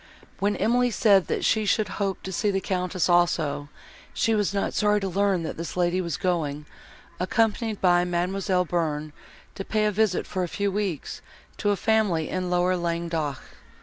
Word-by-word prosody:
When 205 Hz, +1 st, +1 dB
Emily 245 Hz, +2 st, +2 dB
said 200 Hz, -3 st, +4 dB
that -, -, -1 dB
she 220 Hz, -1 st, +2 dB
should 210 Hz, 0 st, +1 dB
hope 195 Hz, -1 st, -1 dB
to 190 Hz, -, -5 dB
see 205 Hz, +3 st, 0 dB
the 195 Hz, -1 st, +1 dB
Countess 185 Hz, -1 st, -1 dB
also, 170 Hz, -5 st, +1 dB, 0.5 s
she 225 Hz, -, +2 dB
was 205 Hz, -2 st, +1 dB
not 200 Hz, -1 st, -1 dB
sorry 210 Hz, -1 st, +2 dB
to 195 Hz, -, -3 dB
learn 190 Hz, -1 st, +1 dB
that 160 Hz, -, -5 dB
this 165 Hz, +2 st, -6 dB
lady 180 Hz, +1 st, +1 dB
was 170 Hz, -3 st, -3 dB
going, 160 Hz, -6 st, -1 dB, 0.5 s
accompanied 220 Hz, +2 st, 0 dB
by 175 Hz, -1 st, +4 dB
Mademoiselle 180 Hz, +1 st, 0 dB
Bearn, 155 Hz, -3 st, -2 dB, 0.4 s
to 195 Hz, -, -5 dB
pay 215 Hz, +1 st, 0 dB
a 210 Hz, -, +2 dB
visit, 210 Hz, -2 st, +1 dB
for 185 Hz, -, -3 dB
a -, -, -1 dB
few 200 Hz, +3 st, -1 dB
weeks, 195 Hz, -6 st, -3 dB, 0.4 s
to 205 Hz, -, 0 dB
a 205 Hz, -, +3 dB
family 205 Hz, -7 st, +1 dB
in 185 Hz, -1 st, -2 dB
lower 180 Hz, +1 st, +2 dB
Languedoc. 170 Hz, -4 st, -2 dB
185 Hz, 180 wpm, -25 LUFS, 175-205 Hz, 0.5 s, said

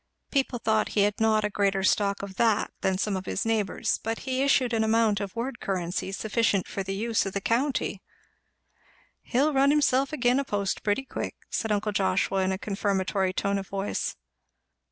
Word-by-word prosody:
People 270 Hz, -3 st, +1 dB
thought 220 Hz, -2 st, +1 dB
he -, -, +5 dB
had 205 Hz, 0 st, +1 dB
not 220 Hz, -1 st, +3 dB
a -, -, 0 dB
greater 195 Hz, -1 st, +1 dB
stock 200 Hz, +1 st, +1 dB
of 200 Hz, -1 st, -6 dB
that 225 Hz, -3 st, +2 dB
than 190 Hz, -1 st, +1 dB
some 205 Hz, +1 st, -1 dB
of 190 Hz, 0 st, -5 dB
his 200 Hz, -, -2 dB
neighbours; 220 Hz, -4 st, 0 dB
but 225 Hz, +1 st, -2 dB
he 260 Hz, 0 st, 0 dB
issued 265 Hz, -3 st, +3 dB
an 220 Hz, -1 st, +2 dB
amount 220 Hz, -2 st, +2 dB
of 200 Hz, -2 st, -5 dB
word 235 Hz, +1 st, -3 dB
currency 185 Hz, 0 st, -2 dB
sufficient 210 Hz, 0 st, 0 dB
for 195 Hz, -, -4 dB
the 195 Hz, 0 st, -3 dB
use 220 Hz, 0 st, 0 dB
of 195 Hz, -, -5 dB
the 200 Hz, -, -1 dB
county. 230 Hz, -2 st, 0 dB, 1.2 s
"He'll 285 Hz, +5 st, +1 dB
run 275 Hz, +1 st, +4 dB
himself 275 Hz, -2 st, +3 dB
agin 250 Hz, -3 st, +2 dB
a -, -, 0 dB
post 200 Hz, -6 st, -2 dB
pretty 215 Hz, +6 st, 0 dB
quick," -, -, -5 dB, 0.2 s
said 220 Hz, -, -1 dB
uncle 210 Hz, +1 st, 0 dB
Joshua 195 Hz, 0 st, +1 dB
in 190 Hz, 0 st, +1 dB
a 190 Hz, -, -1 dB
confirmatory 195 Hz, -1 st, 0 dB
tone 200 Hz, +1 st, 0 dB
of 195 Hz, -, -7 dB
voice. 195 Hz, 0 st, -2 dB
210 Hz, 190 wpm, -27 LUFS, 195-235 Hz, 1.2 s, he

